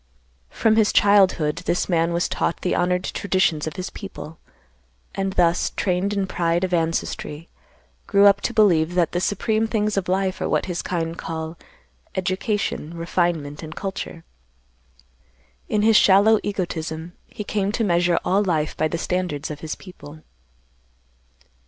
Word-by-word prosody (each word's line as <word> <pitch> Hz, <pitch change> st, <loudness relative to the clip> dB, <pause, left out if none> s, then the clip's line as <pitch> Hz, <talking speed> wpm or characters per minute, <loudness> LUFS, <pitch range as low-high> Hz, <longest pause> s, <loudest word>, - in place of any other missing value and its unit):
"From 220 Hz, -1 st, +2 dB
his 215 Hz, -2 st, +4 dB
childhood 190 Hz, -7 st, +4 dB
this 175 Hz, -, +1 dB
man 170 Hz, -2 st, +1 dB
was 170 Hz, +1 st, 0 dB
taught 170 Hz, -, -2 dB
the 180 Hz, -, 0 dB
honored 180 Hz, +1 st, +1 dB
traditions 185 Hz, -7 st, 0 dB
of 155 Hz, -, -5 dB
his 185 Hz, -1 st, -5 dB
people, 165 Hz, -6 st, -9 dB, 0.7 s
and, 195 Hz, -1 st, -2 dB
thus 175 Hz, -2 st, +2 dB
trained 185 Hz, +1 st, 0 dB
in 200 Hz, -1 st, 0 dB
pride 175 Hz, -1 st, 0 dB
of 185 Hz, -1 st, -1 dB
ancestry, 165 Hz, -1 st, -2 dB, 0.6 s
grew 200 Hz, -1 st, +5 dB
up 200 Hz, 0 st, +5 dB
to -, -, -1 dB
believe 180 Hz, -7 st, +3 dB
that 175 Hz, -3 st, +2 dB
the 175 Hz, -, -1 dB
supreme 220 Hz, +3 st, 0 dB
things 215 Hz, -2 st, -1 dB
of 190 Hz, -2 st, -1 dB
life 190 Hz, 0 st, 0 dB
are -, -, -1 dB
what -, -, +1 dB
his 175 Hz, -2 st, -3 dB
kind 165 Hz, -2 st, -3 dB
call 160 Hz, 0 st, -5 dB, 0.6 s
education, 185 Hz, -3 st, -2 dB
refinement, 165 Hz, -4 st, -1 dB
and 160 Hz, -1 st, -8 dB
culture. 190 Hz, -4 st, -5 dB, 1.5 s
In 210 Hz, -, +1 dB
his 220 Hz, -1 st, +6 dB
shallow 205 Hz, +3 st, +5 dB
egotism, 170 Hz, -4 st, -4 dB
he 210 Hz, -, -7 dB
came 205 Hz, -1 st, -1 dB
to 230 Hz, -, 0 dB
measure 175 Hz, -3 st, +2 dB
all 200 Hz, +2 st, +2 dB
life 160 Hz, -5 st, -1 dB
by 155 Hz, -, +1 dB
the 170 Hz, -, -3 dB
standards 165 Hz, -5 st, -2 dB
of 150 Hz, -, -7 dB
his 155 Hz, 0 st, -5 dB
people. 155 Hz, -5 st, -13 dB
180 Hz, 150 wpm, -22 LUFS, 165-200 Hz, 1.5 s, his